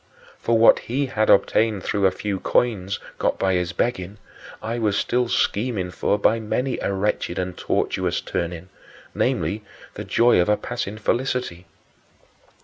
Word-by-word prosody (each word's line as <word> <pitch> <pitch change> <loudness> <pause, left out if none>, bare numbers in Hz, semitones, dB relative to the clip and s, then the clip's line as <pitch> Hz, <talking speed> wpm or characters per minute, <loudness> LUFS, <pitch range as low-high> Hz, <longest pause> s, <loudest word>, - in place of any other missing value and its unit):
For 115 0 +2
what 115 - +6
he 135 +4 -2
had 110 -4 0
obtained 105 0 +3
through 100 -1 +2
a - - +1
few 100 -1 -3
coins, 100 -5 0 0.2
got - - +1
by 95 -1 +1
his 90 -1 0
begging, 100 -3 -2 0.4
I 115 +2 -3
was 105 -3 +1
still 125 0 +1
scheming 100 -6 0
for 95 +3 0
by 110 +2 +2
many 125 +4 -2
a - - -1
wretched 95 -3 -1
and 90 -1 -3
tortuous - - -1
turning 85 +1 -4 0.4
namely, 105 +2 0 0.3
the - - -6
joy 120 -5 +4
of 90 - 0
a 105 - +3
passing 120 -4 -4
felicity. 120 -7 -2
105 Hz, 150 wpm, -23 LUFS, 95-115 Hz, 0.4 s, what